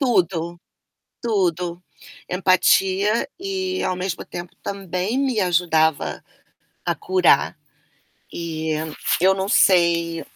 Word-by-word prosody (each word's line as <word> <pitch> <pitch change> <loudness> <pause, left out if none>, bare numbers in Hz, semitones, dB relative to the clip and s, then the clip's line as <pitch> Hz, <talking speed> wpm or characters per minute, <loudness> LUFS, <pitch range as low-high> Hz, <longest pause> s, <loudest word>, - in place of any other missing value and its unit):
Tudo, 175 - 0 0.6
tudo, 180 -6 -1 0.4
empatia 190 +3 +2
e 375 -1 -3
ao 185 - 0
mesmo 180 -1 -4
tempo, 175 0 -8
também 195 +4 -2
me 260 -5 0
ajudava, 165 -4 +1 0.6
a - - -1
curar. 375 -3 +2 0.8
E, 160 -2 -3 0.4
eu 190 +3 +4
não 190 0 -2
sei 170 -4 +3
185 Hz, 95 wpm, -22 LUFS, 170-210 Hz, 0.8 s, eu